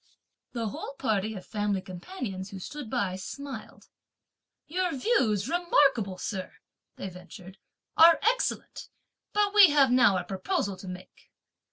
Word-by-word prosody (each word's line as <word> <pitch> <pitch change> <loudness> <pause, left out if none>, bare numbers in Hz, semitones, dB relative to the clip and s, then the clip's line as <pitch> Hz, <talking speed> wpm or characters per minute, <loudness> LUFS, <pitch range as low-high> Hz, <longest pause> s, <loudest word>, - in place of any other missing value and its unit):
The 230 -3 -2
whole 275 - -7
party 220 -3 -1
of 185 - -8
family 205 -2 -1
companions, 190 - -7
who 195 - -8
stood 270 +6 -7
by, 185 -3 -1
smiled. 280 +8 -8 0.8
"Your 360 0 -1
views, 230 - +1
remarkable 275 - +2
sir," 190 -2 -5 0.4
they - - -6
ventured, 185 +1 -12 0.4
"are 330 0 +8
excellent; - - -1 0.4
but 415 -1 +1
we 405 -4 +9
have 280 -3 +4
now 250 -6 +5
a - - -2
proposal 195 +1 -2
to 190 - -11
make. 180 0 -11
215 Hz, 135 wpm, -28 LUFS, 190-295 Hz, 0.8 s, we